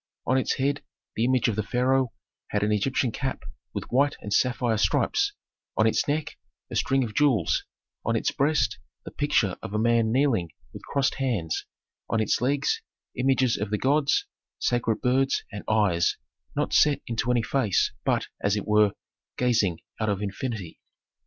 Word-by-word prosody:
On 130 - +2
its 130 - +1
head 140 +2 0 0.3
the 115 - +1
image 130 -1 +2
of 115 - 0
the 110 - 0
pharaoh 125 +3 +1 0.4
had 105 0 -1
an 105 - +1
Egyptian 120 +4 +1
cap 135 +3 -3 0.3
with - - -4
white 140 +4 +3
and 105 - -4
sapphire 120 -1 +2
stripes; - - +2 0.4
on 110 - +4
its 110 - +2
neck, 150 +1 -2 0.3
a - - -4
string 135 0 +2
of 110 -3 -5
jewels; 110 - +2 0.4
on - - 0
its - - +1
breast, 150 +2 +1 0.3
the - - -7
picture 135 -10 +1
of 105 - -6
a - - +2
man 115 0 +3
kneeling 120 - +2 0.2
with - - -9
crossed 140 -1 0
hands; 105 -13 -1 0.4
on 115 - +1
its 110 +1 +1
legs, 140 +3 +1 0.3
images 130 -1 +2
of 105 0 -3
the 105 - 0
gods, 140 +4 +2 0.3
sacred 115 -2 0
birds, 135 +2 +2
and 105 - -6
eyes, 100 -6 +2 0.4
not - - -1
set 150 -1 +5
into 115 +1 -2
any 120 -2 +2
face, 120 -8 +1
but, - - +1 0.2
as 100 0 +2
it 105 - -3
were, 105 -1 +4 0.4
gazing 110 -9 +1 0.2
out 110 -1 0
of 100 -2 0
infinity. 100 -3 -4
120 Hz, 170 wpm, -26 LUFS, 105-135 Hz, 0.4 s, set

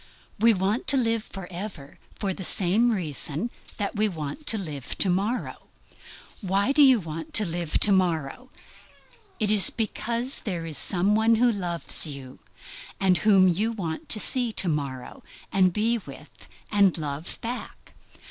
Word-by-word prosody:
We 230 +2 +5
want 200 +3 -1
to 280 - +4
live 230 -3 0
forever 180 -5 -9 0.2
for 195 -2 -3
the 190 - -8
same 200 +7 +4
reason 170 - -2 0.3
that 205 0 -3
we 215 0 +1
want 160 - -7
to 225 - +3
live 150 -9 -7
to 190 - +2
morrow. 205 +7 -3 0.7
Why 200 +5 0
do 290 +2 +3
we 265 -2 +7
want 165 -4 -7
to 215 - +5
live 170 -2 -2
to 205 - +7
morrow? 180 - -1 0.9
Is 210 -2 +5
it - - -17
because 235 +3 0
there 175 -6 -5
is 160 -2 -5
some 190 +3 +2
one 220 +2 +3
who 240 +2 +3
loves 175 -5 +2
you, 135 -3 -9 0.6
and 185 -2 +2
whom 195 -3 +4
you 210 +6 0
want 165 -7 -6
to 215 - +4
see 245 +1 +1
to 190 - -1
morrow, 140 -5 -4 0.3
and 185 -2 +3
be 225 +5 0
with, 150 -4 -14 0.2
and 200 -4 +3
love 150 +1 -5
back? 240 +2 -7
195 Hz, 155 wpm, -25 LUFS, 165-220 Hz, 0.9 s, we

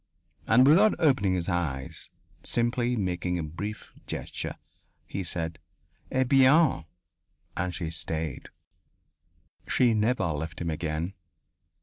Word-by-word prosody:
And 125 +3 +6
without 190 +10 +6
opening 130 - +3
his 85 -2 -2
eyes, 80 -7 -3 0.3
simply 120 +1 0
making 90 -3 -1
a 85 - -2
brief 100 +8 -6
gesture, - - -4 0.5
he 95 - -4
said: 80 -1 -3 0.5
"Eh 130 - +2
bien." 135 - +4 0.7
And 90 0 -1
she 85 -4 -3
stayed. 80 -3 -3 1.2
She 120 -3 +3
never 110 -1 +1
left 80 0 -3
him 85 -1 -2
again. 80 +3 -3
95 Hz, 110 wpm, -28 LUFS, 80-125 Hz, 1.2 s, And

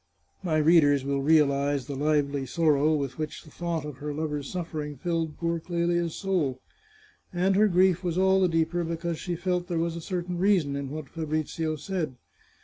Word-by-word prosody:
My 165 -5 0
readers 150 -3 +5
will 140 0 0
realize 140 -2 +3
the 140 - -5
lively 145 -1 0
sorrow 155 0 +3
with 140 -1 -3
which 155 -1 -4
the 155 - -16
thought 170 -2 -3
of 150 -3 -7
her 145 +1 -5
lover's 150 -2 -3
suffering 155 -5 -4
filled 165 0 -2
poor 170 0 -1
Clelia's 170 0 -1
soul. 170 -10 -1 0.7
And 185 +2 +1
her 210 +2 +5
grief 185 -1 +3
was 175 -1 -1
all 190 0 +4
the 185 - +5
deeper 165 +1 +1
because 165 0 -3
she 175 -1 -3
felt 180 +1 -1
there 170 - -2
was 165 0 -1
a 170 - -5
certain 175 0 -3
reason 180 -8 +2
in 140 -1 -4
what 155 0 -6
Fabrizio 155 0 -2
said. 155 -3 -3
160 Hz, 180 wpm, -27 LUFS, 145-175 Hz, 0.7 s, readers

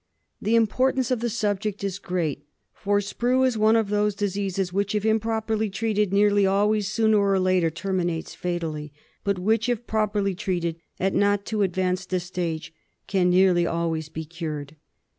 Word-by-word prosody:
The 220 +2 +2
importance 255 +3 +2
of 250 - +1
the 235 +1 -1
subject 210 -2 -2
is 195 -1 -2
great, 155 -7 -3 0.3
for 205 0 0
Sprue 245 +6 +1
is 255 -2 +1
one 215 +1 +4
of 220 -3 +2
those 210 0 +1
diseases 195 -2 -2
which, 200 +1 0
if 210 0 0
improperly 220 0 0
treated, 210 -1 0
nearly 205 0 +4
always 205 +1 +2
sooner 220 +1 +3
or 200 -1 +2
later 185 -2 +2
terminates 175 -1 -2
fatally; 165 -4 -4 0.3
but 200 -1 0
which, 220 +5 +1
if 240 -1 -1
properly 210 -3 0
treated 175 -3 -2 0.2
at 190 +1 +1
not 205 0 +2
too 215 -2 -1
advanced 185 0 -1
a 185 - +2
stage, 175 -3 -4 0.3
can 185 -3 +2
nearly 180 -1 +4
always 165 -2 -2
be 160 0 -6
cured. 155 -3 -6
200 Hz, 160 wpm, -25 LUFS, 180-215 Hz, 0.3 s, one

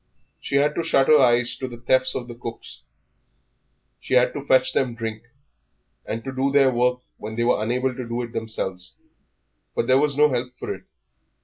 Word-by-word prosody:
She - - -4
had 145 +2 +3
to - - -1
shut 135 -4 +2
her 155 -1 +7
eyes 120 -2 +3
to 130 - -4
the 120 -2 -9
thefts 130 +2 +1
of 125 - -4
cooks; 115 -1 -8 1.2
she 130 - -2
had 125 0 +4
to 145 - -5
fetch 130 -1 +3
them 125 -3 0
drink, 115 0 -6 0.8
and 115 +1 -4
to 135 - -5
do 135 +1 0
their 135 -2 +4
work 125 +1 +1 0.2
when 110 +1 -7
they 120 - 0
were 120 -2 +2
unable 125 +4 0
to 125 -1 -6
do 120 +1 -3
it 120 - -8
themselves. 95 -5 -5 0.8
But - - 0
there 130 +2 +4
was 145 -1 +2
no 150 0 +5
help 125 -1 -3
for - - -4
it. - - -13
125 Hz, 195 wpm, -23 LUFS, 120-135 Hz, 1.2 s, her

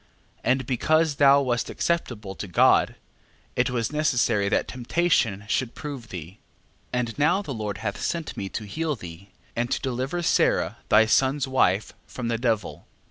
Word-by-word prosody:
12:13. - - -33
And 130 0 +2
because 155 +5 +2
thou 140 0 +6
wast 120 -2 -1
acceptable 120 - -2
to 100 - -7
God, 90 - +4 0.6
it 125 0 +2
was 120 -2 -1
necessary 125 -9 +1
that - - +1
temptation 120 - 0
should 120 +2 -1
prove 140 -6 -7
thee. 90 +1 -8 0.5
12:14. 125 - 0
And 120 +1 -3
now 175 +7 +3
the 145 - -5
Lord 105 -4 -4
hath 100 0 -4
sent 165 -2 -3
me 100 -1 -4
to 110 - -5
heal 155 +8 -2
thee, 90 -2 -11 0.3
and 120 +1 -1
to - - 0
deliver 135 +7 -2
Sara - - +2
thy 110 +1 +6
son's 135 +4 +2
wife 110 -6 +1
from 120 -2 -5
the 115 -1 -1
devil. 115 -5 -2
125 Hz, 170 wpm, -25 LUFS, 105-140 Hz, 0.6 s, thou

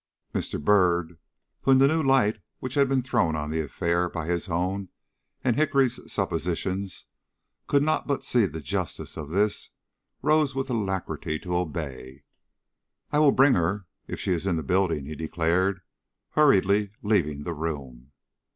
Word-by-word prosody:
Mr. - - -2
Byrd, 85 -1 +2 0.4
who, - - -2
in - - +6
the 135 +1 +6
new 160 +3 +2
light 130 -6 +3 0.2
which 130 0 -6
had 140 -1 +3
been 135 -2 +1
thrown 85 -10 +1
on 75 0 -3
the 80 0 0
affair 85 +4 0
by 85 -2 -4
his 85 +2 -2
own 90 +3 -1 0.5
and 120 -3 +2
Hickory's 140 -4 +1
suppositions, 95 +2 -2 0.6
could 140 0 +3
not 155 +1 0
but 140 -2 -1
see 120 -5 +3
the 80 0 -7
justice 70 - -4
of 75 -1 -6
this, 100 +5 0 0.5
rose 150 -2 +3
with 135 0 -2
alacrity 95 -7 -2
to 90 +2 -4
obey. 70 -5 -4 0.9
"I 150 - +2
will 150 -2 +6
bring 135 +1 +5
her 90 +3 0 0.2
if - - -5
she - - -1
is 90 +1 -1
in 90 - +2
the 80 - -2
building," 85 -3 +1
he 75 - -6
declared, 85 +4 0 0.5
hurriedly 105 -8 +4
leaving 80 -9 +1
the 85 - -3
room. 70 -5 -5
95 Hz, 160 wpm, -26 LUFS, 80-125 Hz, 0.9 s, in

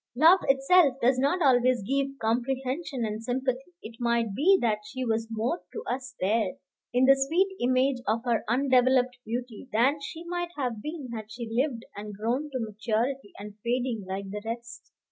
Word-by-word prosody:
Love 325 +8 +7
itself 275 +2 +5
does 255 +1 +3
not 315 +7 +2
always 250 -4 +4
give 275 +4 -1
comprehension 255 +4 -1
and 215 +1 -4
sympathy. 260 +6 -2
It 225 +1 -9
might 235 -3 +1
be 365 - +5
that 215 -3 +1
she 260 0 -5
was 225 -1 0
more 230 +9 -1
to 450 - -5
us 260 - -4
there, 220 +7 +1 0.4
in 250 +1 +3
the 270 - +8
sweet 335 +9 +1
image 255 +1 +2
of 225 +3 +1
her 235 -2 +1
undeveloped 255 0 +3
beauty, 240 +2 -5
than 265 +7 +2
she 320 +4 -7
might 350 0 -3
have 245 -6 -2
been 300 -1 -6
had 220 -1 -7
she 235 0 -6
lived 245 0 0
and 210 0 -7
grown 245 +8 -1
to 260 -2 -3
maturity 225 +3 -2
and 205 +1 -10
fading, 240 -2 -1
like 195 +1 -4
the 210 +1 -5
rest. 230 +1 -7
250 Hz, 175 wpm, -27 LUFS, 225-275 Hz, 0.4 s, the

